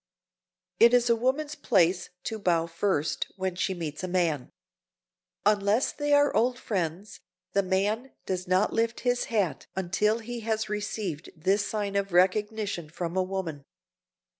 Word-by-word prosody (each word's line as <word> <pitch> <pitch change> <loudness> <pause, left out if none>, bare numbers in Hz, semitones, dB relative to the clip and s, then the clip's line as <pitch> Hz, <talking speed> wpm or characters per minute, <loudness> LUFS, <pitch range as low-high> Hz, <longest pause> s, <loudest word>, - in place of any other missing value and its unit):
It 235 +1 +7
is 245 -1 +3
a - - +5
woman's 270 +6 0
place 185 - +2
to 220 -1 -4
bow 170 -4 +2
first, 165 -2 -1
when 190 -2 -2
she 190 +1 -1
meets 160 -1 -5
a - - -1
man. 170 -7 0 1.0
Unless 210 +3 +3
they 290 -1 -2
are 290 0 +4
old 245 +3 +2
friends, 190 -3 -3 0.3
the 200 - +4
man 205 +7 0
does 185 -1 -3
not 185 +3 +2
lift 230 +1 0
his 245 0 +1
hat 195 -11 -1
until 190 +4 +1
he 235 +1 -6
has 220 -1 -2
received 205 -6 -3
this 195 +5 +1
sign 205 -2 -2
of 200 -2 -1
recognition 200 -1 +1
from 170 +1 -4
a 190 - +3
woman. 185 -6 -4
200 Hz, 150 wpm, -28 LUFS, 180-225 Hz, 1.0 s, It